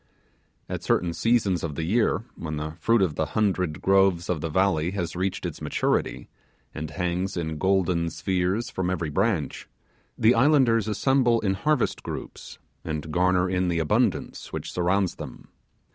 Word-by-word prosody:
At -, -, -4 dB
a -, -, -20 dB
certain 85 Hz, -1 st, +1 dB
season 110 Hz, -3 st, +2 dB
of 75 Hz, -3 st, -4 dB
the 80 Hz, -, -3 dB
year, 110 Hz, +4 st, +1 dB
when 75 Hz, -2 st, -5 dB
the 75 Hz, +1 st, -4 dB
fruit 115 Hz, +4 st, +3 dB
of 85 Hz, -5 st, 0 dB
the 80 Hz, 0 st, -1 dB
hundred 90 Hz, -7 st, 0 dB
groves 95 Hz, -3 st, +3 dB
of 80 Hz, -4 st, -2 dB
the 80 Hz, -, -2 dB
valley 85 Hz, -1 st, +2 dB
has 90 Hz, -4 st, -3 dB
reached 95 Hz, +1 st, -2 dB
its -, -, -5 dB
maturity, -, -, -1 dB, 0.5 s
and 75 Hz, 0 st, -5 dB
hangs 90 Hz, +3 st, -2 dB
in 80 Hz, -2 st, -3 dB
golden 90 Hz, -3 st, +1 dB
spheres 90 Hz, +6 st, -1 dB
from 90 Hz, -1 st, -2 dB
every 85 Hz, -4 st, -2 dB
branch, 80 Hz, -, -1 dB, 0.5 s
the 110 Hz, +2 st, +5 dB
islanders 120 Hz, -4 st, +4 dB
assemble 120 Hz, +1 st, +2 dB
in 95 Hz, -2 st, +1 dB
harvest 145 Hz, +6 st, 0 dB
groups, -, -, -7 dB, 0.3 s
and 80 Hz, -1 st, -4 dB
garner 90 Hz, 0 st, +3 dB
in 90 Hz, 0 st, 0 dB
the 85 Hz, -1 st, 0 dB
abundance 80 Hz, -2 st, 0 dB
which -, -, -5 dB
surrounds 90 Hz, +1 st, 0 dB
them. -, -, -9 dB
90 Hz, 160 wpm, -25 LUFS, 85-100 Hz, 0.5 s, the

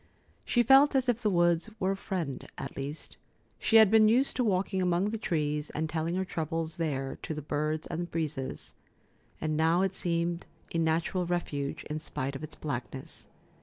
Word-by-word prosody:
She 240 Hz, -, +2 dB
felt 270 Hz, +4 st, +6 dB
as 260 Hz, -1 st, +2 dB
if 245 Hz, -1 st, +1 dB
the 215 Hz, -, +2 dB
woods 175 Hz, +1 st, +2 dB
were 190 Hz, +1 st, +1 dB
a -, -, 0 dB
friend, 175 Hz, -9 st, -4 dB
at 135 Hz, -, -6 dB
least. 140 Hz, +3 st, -6 dB, 0.4 s
She 225 Hz, -, +1 dB
had 220 Hz, -3 st, +8 dB
been 220 Hz, -1 st, +7 dB
used 255 Hz, +5 st, +3 dB
to 255 Hz, -, +2 dB
walking 190 Hz, -2 st, +1 dB
among 180 Hz, +3 st, +1 dB
the 225 Hz, -, -2 dB
trees 150 Hz, -5 st, -1 dB
and 160 Hz, +1 st, 0 dB
telling 160 Hz, +2 st, -2 dB
her 190 Hz, 0 st, 0 dB
troubles 165 Hz, -2 st, -3 dB
there 135 Hz, -5 st, -2 dB
to 160 Hz, -, -4 dB
the 150 Hz, -, -4 dB
birds 155 Hz, +2 st, -1 dB
and 175 Hz, +1 st, -4 dB
breezes, 150 Hz, -5 st, -4 dB, 0.7 s
and 155 Hz, -1 st, -1 dB
now 165 Hz, +4 st, +3 dB
it 195 Hz, -1 st, 0 dB
seemed 170 Hz, -1 st, -1 dB, 0.3 s
a 165 Hz, -, +1 dB
natural 165 Hz, +2 st, +1 dB
refuge, 145 Hz, -5 st, -2 dB
in 155 Hz, +1 st, -4 dB
spite 140 Hz, -3 st, -3 dB
of 135 Hz, -, -6 dB
its 155 Hz, -, -6 dB
blackness. 130 Hz, -2 st, -6 dB
165 Hz, 185 wpm, -30 LUFS, 155-190 Hz, 0.7 s, had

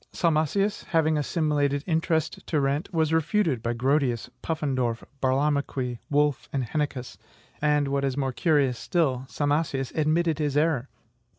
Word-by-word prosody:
Salmasius, 170 Hz, +5 st, +1 dB
having 160 Hz, -2 st, +2 dB
assimilated 145 Hz, -2 st, 0 dB
interest 160 Hz, -2 st, 0 dB
to 155 Hz, -, +1 dB
rent, 140 Hz, +7 st, -1 dB
was 160 Hz, -2 st, +1 dB
REFUTED 160 Hz, -, +1 dB
by 115 Hz, +1 st, -1 dB
Grotius, 130 Hz, -1 st, 0 dB
Pufendorf, 130 Hz, -7 st, -1 dB, 0.2 s
Burlamaqui, 135 Hz, -2 st, 0 dB
Wolf, 145 Hz, -1 st, +1 dB
and 135 Hz, -2 st, -1 dB
Heineccius; 130 Hz, -1 st, -3 dB, 0.4 s
and, 150 Hz, -1 st, +2 dB
what 140 Hz, 0 st, 0 dB
is 135 Hz, -1 st, -1 dB
more 135 Hz, -2 st, -1 dB
curious 140 Hz, -6 st, +2 dB
still, 135 Hz, -7 st, 0 dB
Salmasius 145 Hz, -2 st, -1 dB
ADMITTED 155 Hz, +1 st, +1 dB
HIS 145 Hz, -2 st, 0 dB
ERROR. 150 Hz, -4 st, +1 dB
145 Hz, 130 wpm, -26 LUFS, 135-160 Hz, 0.4 s, having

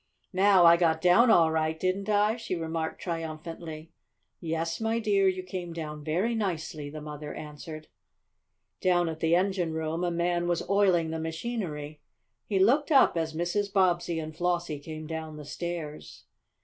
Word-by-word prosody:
"Now, 190 Hz, -1 st, +5 dB
I 170 Hz, 0 st, +8 dB
got 165 Hz, -2 st, +2 dB
down 180 Hz, +8 st, +5 dB
all 165 Hz, -7 st, +5 dB
right, 160 Hz, 0 st, 0 dB
didn't 190 Hz, +3 st, -1 dB
I?" 210 Hz, +1 st, +3 dB
she 230 Hz, -6 st, -4 dB
remarked 160 Hz, -1 st, -3 dB
triumphantly. 165 Hz, -1 st, -6 dB, 0.5 s
"Yes, 165 Hz, +3 st, -2 dB
my 225 Hz, +1 st, +1 dB
dear, 205 Hz, -4 st, +2 dB
you 185 Hz, -1 st, 0 dB
came 180 Hz, -2 st, -6 dB
down 150 Hz, -2 st, -6 dB
very 180 Hz, +10 st, 0 dB
nicely," 165 Hz, -8 st, -3 dB
the 155 Hz, +1 st, -8 dB
mother 150 Hz, 0 st, -7 dB
answered. 155 Hz, +1 st, -8 dB, 0.9 s
Down 175 Hz, -2 st, +3 dB
in 160 Hz, -1 st, -4 dB
the 165 Hz, +1 st, +3 dB
engine 180 Hz, -3 st, 0 dB
room 160 Hz, +2 st, -2 dB
a 175 Hz, -, +1 dB
man 175 Hz, 0 st, 0 dB
was 175 Hz, -1 st, -1 dB
oiling 185 Hz, -5 st, +3 dB
the 160 Hz, -, -3 dB
machinery. 160 Hz, -4 st, -4 dB, 0.5 s
He 200 Hz, -, 0 dB
looked 265 Hz, +11 st, +3 dB
up 270 Hz, -, +6 dB
as 160 Hz, -1 st, -2 dB
Mrs. 185 Hz, +5 st, -1 dB
Bobbsey 175 Hz, -3 st, +2 dB
and 155 Hz, -1 st, -5 dB
Flossie 175 Hz, -3 st, -1 dB
came 155 Hz, +1 st, -8 dB
down 160 Hz, -1 st, -6 dB
the 150 Hz, -, -9 dB
stairs. 160 Hz, -1 st, -6 dB
170 Hz, 160 wpm, -28 LUFS, 160-185 Hz, 0.9 s, I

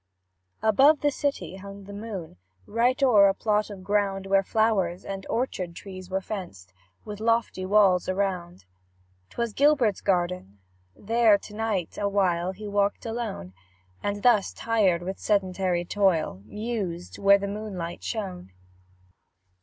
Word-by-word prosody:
Above 270 Hz, +8 st, +5 dB
the 290 Hz, -, +2 dB
city 190 Hz, -, -3 dB
hung 200 Hz, +1 st, -10 dB
the 200 Hz, +1 st, -10 dB
moon, 200 Hz, -, -7 dB, 0.3 s
Right 245 Hz, +3 st, +1 dB
o'er 210 Hz, -7 st, +6 dB
a 195 Hz, -, +2 dB
plot 210 Hz, 0 st, 0 dB
of 195 Hz, -3 st, -9 dB
ground 195 Hz, -1 st, 0 dB
Where 195 Hz, 0 st, +3 dB
flowers 195 Hz, -4 st, 0 dB
and 195 Hz, -1 st, -6 dB
orchard 190 Hz, -8 st, -2 dB
trees 185 Hz, -1 st, -9 dB
were 190 Hz, +1 st, -1 dB
fenced 175 Hz, -, -7 dB, 0.3 s
With 210 Hz, -1 st, -7 dB
lofty 225 Hz, -4 st, 0 dB
walls 190 Hz, -3 st, +4 dB
around: 185 Hz, -, -2 dB, 0.6 s
'Twas 235 Hz, -2 st, -3 dB
Gilbert's 275 Hz, -8 st, +3 dB
garden 175 Hz, -, -1 dB, 0.4 s
there 225 Hz, -1 st, +3 dB
to 205 Hz, -, -13 dB
night 210 Hz, -5 st, -2 dB
Awhile 190 Hz, -3 st, +1 dB
he 210 Hz, +2 st, -8 dB
walked 200 Hz, +1 st, 0 dB
alone; 225 Hz, -, -4 dB, 0.5 s
And, 205 Hz, 0 st, -3 dB, 0.3 s
tired 200 Hz, -7 st, +1 dB
with 190 Hz, +2 st, -5 dB
sedentary 185 Hz, -3 st, 0 dB
toil, 175 Hz, -, +1 dB
Mused 205 Hz, -, -5 dB
where 200 Hz, 0 st, +6 dB
the 200 Hz, 0 st, -4 dB
moonlight 200 Hz, -5 st, -5 dB
shone. 185 Hz, -, -5 dB
200 Hz, 130 wpm, -26 LUFS, 185-215 Hz, 0.6 s, o'er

